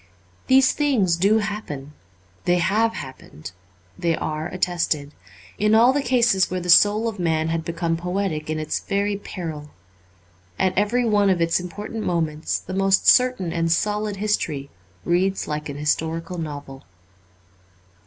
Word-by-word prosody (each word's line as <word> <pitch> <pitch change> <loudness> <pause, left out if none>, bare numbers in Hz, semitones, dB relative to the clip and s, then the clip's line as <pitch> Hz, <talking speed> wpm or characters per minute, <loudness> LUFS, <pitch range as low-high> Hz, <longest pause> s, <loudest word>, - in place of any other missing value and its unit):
These 265 0 +5
things 245 - +1
do 200 +6 +3
happen; 200 -10 -5 0.5
they 175 0 +3
have 215 +6 +1
happened; 90 - -9 0.5
they 170 -1 +1
are 155 +1 -3
attested, 170 -5 -1 0.5
in 210 +1 +3
all 240 +3 +6
the 285 - +1
cases 235 -7 +2
where 185 - -2
the 180 0 +1
soul 210 +5 +5
of 215 -3 -5
man 160 -2 0
had 165 0 -1
become 165 0 -2
poetic 180 -3 -3
in 155 - -1
its 155 0 -2
very 200 +1 -1
peril. 160 -7 -7 0.9
At 185 - +1
every 225 +5 +1
one 205 -3 +3
of 185 -2 +2
its 165 +1 +2
important 210 +5 -6
moments 160 -4 -1
the 185 - -8
most 195 0 +2
certain 250 -9 +4
and 165 -1 0
solid 210 +3 0
history 165 -9 -2 0.3
reads 190 +3 0
like 150 0 -4
an 140 - -6
historical 165 +3 -2
novel. 145 -4 -7
180 Hz, 145 wpm, -22 LUFS, 160-210 Hz, 0.9 s, all